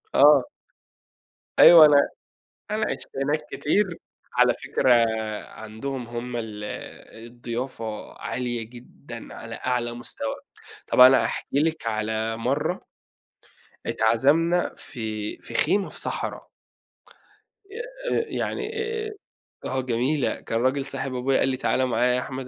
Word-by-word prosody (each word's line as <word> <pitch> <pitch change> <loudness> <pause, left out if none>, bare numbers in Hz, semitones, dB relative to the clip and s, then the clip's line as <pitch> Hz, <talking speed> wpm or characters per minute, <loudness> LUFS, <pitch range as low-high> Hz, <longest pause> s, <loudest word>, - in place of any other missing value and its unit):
آه. 145 -2 +7 1.2
أيوه، 165 -3 +10
أنا 150 -1 +6 0.8
أنا 215 0 0
عِشت - - -5 0.2
هناك 150 +2 0
كتير. 185 +2 0 0.4
على - - +4
فكرة 130 - 0
آآ، 110 -2 +1
عندهم 115 +4 -6
هم 120 +1 -5
ال 105 -2 -5
آآ 110 - -9
الضيافة 120 -2 -6
عالية 120 -2 -3
جدًا 120 0 -11
على - - -8
أعلى 120 -2 -1
مستوى. 120 -1 -4 0.5
طَب - - +2
أنا 130 +1 +8
هاحكي 140 - -2
لِك 160 -5 -1
على 110 0 -1
مَرّة 115 - -1 1.0
اتعزمنا 145 +10 +2
في 110 -4 -5
في - - -10
خيمة 200 -1 +2
في - - -4
صحرا. - - -4 1.2
آآ، - - -3
يعني 430 - -3 0.4
آآ، - - -6 0.5
آه 130 0 -1
جميلة، 130 +3 0
كان 115 +1 -2
راجل 135 +2 +1
صاحب 135 -1 -4
أبويا 130 +2 +1
قال 135 - +2
لي 130 - -1
تعالَ 130 0 +1
معايا 125 +1 +2
يا - - +1
أحمد، 130 0 -6
125 Hz, 125 wpm, -25 LUFS, 115-145 Hz, 1.2 s, أيوه